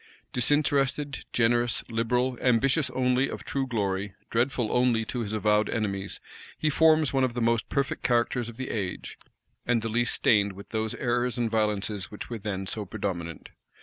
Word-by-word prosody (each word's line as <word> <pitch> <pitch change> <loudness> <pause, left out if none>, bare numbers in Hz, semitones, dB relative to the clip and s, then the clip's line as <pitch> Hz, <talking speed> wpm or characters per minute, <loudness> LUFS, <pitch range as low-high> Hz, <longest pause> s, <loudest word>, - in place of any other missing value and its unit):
Disinterested, 140 +1 +1
generous, 120 0 +2
liberal; 125 +3 0
ambitious 130 +4 +3
only 125 +1 +1
of - - -6
true 135 -1 -2
glory, 100 -4 -2 0.2
dreadful 120 -1 +1
only 120 -3 +2
to 125 - -4
his 110 -3 -3
avowed 105 0 +2
enemies; 100 -3 -2 0.4
he 155 - +1
forms 155 -1 +4
one 135 -1 +3
of 125 -2 0
the - - -1
most 115 -1 +1
perfect 140 -1 -1
characters 120 -1 +1
of 115 - -11
the 130 0 -4
age, 100 -5 -4 0.4
and 120 -2 +1
the 115 - -2
least 120 +2 +1
stained 100 -3 +3
with 100 +2 -12
those 110 -1 -2
errors 120 0 0
and 115 -2 0
violences 105 -2 0
which 105 - -8
were 115 - -3
then 95 -2 -3
so 105 +2 -4
predominant. 85 -4 -5
115 Hz, 170 wpm, -27 LUFS, 105-125 Hz, 0.4 s, forms